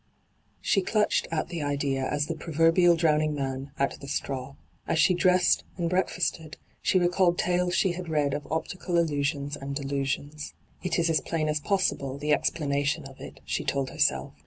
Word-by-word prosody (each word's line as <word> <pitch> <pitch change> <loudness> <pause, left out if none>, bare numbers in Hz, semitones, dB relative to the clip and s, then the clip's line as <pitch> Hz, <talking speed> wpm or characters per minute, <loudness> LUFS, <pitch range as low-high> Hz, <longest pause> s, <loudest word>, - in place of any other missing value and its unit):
She 195 - +2
clutched 210 +2 +1
at 165 0 -2
the 170 -3 -4
idea 140 -2 -1
as 145 0 0
the 165 - -3
proverbial 165 +2 +3
drowning 155 -2 +2
man 135 -1 -3
at 140 - -1
the 140 - -8
straw. 135 -1 -3 0.3
As - - +1
she 180 - +5
dressed 180 0 +3
and 170 -1 -1
break&sted 175 -3 -1 0.2
she - - +2
recalled 175 0 +3
tales 180 0 +1
she 190 - +3
had 175 -1 -6
read 145 -3 +1
of 145 0 -4
optical 175 +2 -2
illusions 145 -3 0
and 140 -1 -6
delusions. 140 +1 -3
' - - -31
It 180 -2 0
is 170 -1 +2
as 155 - +2
plain 160 -2 -1
as 150 0 0
possible, 145 -7 0
the 150 +1 +1
explanation 145 -1 0
of - - -12
it,* - - -10
she - - -2
told 135 -1 -1
herself. 65 0 +1
155 Hz, 180 wpm, -27 LUFS, 140-175 Hz, 0.3 s, she